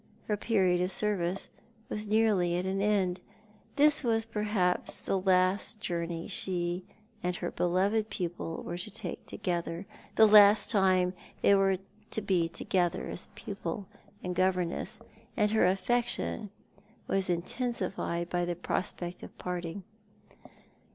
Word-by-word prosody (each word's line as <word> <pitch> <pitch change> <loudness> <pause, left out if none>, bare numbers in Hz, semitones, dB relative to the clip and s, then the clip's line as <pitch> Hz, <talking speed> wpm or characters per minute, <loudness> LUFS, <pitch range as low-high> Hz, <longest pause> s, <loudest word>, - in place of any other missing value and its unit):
Her 210 - +1
period 190 -5 +2
of 180 +1 0
service 195 -3 0 0.4
was 210 0 -4
nearly 205 -5 +3
at 180 - -2
an 190 +1 -1
end. 195 -3 +1 0.6
This 295 +1 +5
was 225 -2 +2
perhaps 210 -5 0
the 195 - -1
last 185 +3 +2
journey 170 -4 -3
she 180 -2 -2 0.4
and 180 0 -1
her 175 0 -3
beloved 200 +5 +1
pupil 170 -2 -4
were 175 - -5
to - - -5
take 220 - -6
together, 170 0 -3 0.3
the 220 - +8
last 210 +1 +7
time 185 -4 +3 0.3
they - - +6
were 195 -1 +3 0.3
to 220 - -1
be 180 -4 +2
together 175 0 0
as - - -6
pupil 200 -2 -5 0.4
and 180 - -2
governess, 185 +3 0 0.4
and 210 -2 +3
her 220 -4 +4
affection 210 +2 0 0.6
was 195 -1 0
intensified 175 -2 -2
by 175 0 -1
the 175 0 -1
prospect 175 0 -3
of - - -11
parting. 180 +1 -4
185 Hz, 130 wpm, -30 LUFS, 175-210 Hz, 0.6 s, the